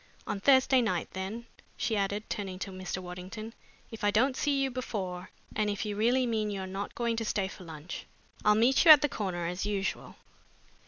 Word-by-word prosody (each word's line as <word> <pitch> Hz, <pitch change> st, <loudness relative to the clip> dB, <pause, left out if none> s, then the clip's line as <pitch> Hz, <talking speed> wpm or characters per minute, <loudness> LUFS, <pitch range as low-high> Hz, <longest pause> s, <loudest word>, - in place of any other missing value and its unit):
On 200 Hz, -, -3 dB
Thursday 260 Hz, +2 st, +5 dB
night, 185 Hz, -7 st, -1 dB
then," 195 Hz, +5 st, -5 dB, 0.3 s
she 225 Hz, -, 0 dB
added, 200 Hz, +1 st, -1 dB
turning 190 Hz, -3 st, -4 dB
to 195 Hz, +1 st, -5 dB
Mr. 185 Hz, -1 st, -5 dB
Waddington, 185 Hz, +5 st, -7 dB, 0.4 s
"if 225 Hz, -, -9 dB
I 205 Hz, -, +4 dB
don't 255 Hz, +6 st, +3 dB
see 280 Hz, 0 st, +1 dB
you 270 Hz, -, -1 dB
before, 190 Hz, -7 st, -4 dB, 0.3 s
and 210 Hz, -1 st, +1 dB
if 205 Hz, +1 st, -2 dB
you 210 Hz, -1 st, -3 dB
really 245 Hz, +5 st, +3 dB
mean 220 Hz, -3 st, 0 dB
you're 195 Hz, -2 st, -3 dB
not 195 Hz, +2 st, -5 dB
going 235 Hz, -1 st, 0 dB
to 225 Hz, -, -1 dB
stay 205 Hz, -3 st, 0 dB
for 190 Hz, -1 st, -11 dB
lunch. 160 Hz, +1 st, -8 dB, 0.4 s
I'll 210 Hz, 0 st, +5 dB
meet 240 Hz, +5 st, +4 dB
you 340 Hz, -, +5 dB
at 300 Hz, -3 st, +11 dB
the -, -, +4 dB
corner 185 Hz, -7 st, -3 dB
as 180 Hz, +2 st, -3 dB
usual." 200 Hz, -1 st, -2 dB
210 Hz, 200 wpm, -30 LUFS, 190-235 Hz, 0.4 s, at